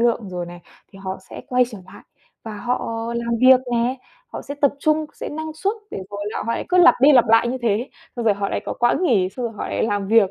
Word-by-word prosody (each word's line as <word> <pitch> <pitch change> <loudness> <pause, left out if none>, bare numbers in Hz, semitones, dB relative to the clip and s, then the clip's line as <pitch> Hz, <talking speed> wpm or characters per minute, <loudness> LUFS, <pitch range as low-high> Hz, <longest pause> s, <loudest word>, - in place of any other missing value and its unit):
lượng 235 -3 +1
rồi 180 -1 -5
này, 175 0 -10 0.3
thì 195 - -13
họ 190 0 -5
sẽ - - -8
quay 250 0 +3
trở 215 - -9
lại 190 - -14 0.4
và 220 -2 -6
họ 245 +4 -2 0.3
làm 235 0 -1
việc 255 0 +7
nè. 240 +2 +1 0.4
Họ - - -6
sẽ 285 - -6
tập 285 -1 +2
trung, 310 +1 +1
sẽ - - -6
năng 315 +1 -5
suất 390 +5 -1 0.2
để - - -5
rồi 205 0 -5
là - - -4
họ 230 - 0
lại - - -3
cứ 365 - +2
lặp 355 - +8
đi 285 +3 +7
lặp 245 -3 +6
lại 225 +1 +5
như 255 +2 -2
thế, 230 +3 0 0.3
xong 235 - -3
rồi 210 -3 +4
họ 200 0 -2
lại - - -2
có - - -2
quãng 240 +9 +2
nghỉ, 205 - +3
xong 250 +4 -5
rồi 225 - -6
họ - - -4
lại - - -1
làm 205 -2 -1
việc. 220 -4 +5
235 Hz, 270 wpm, -21 LUFS, 205-260 Hz, 0.4 s, lặp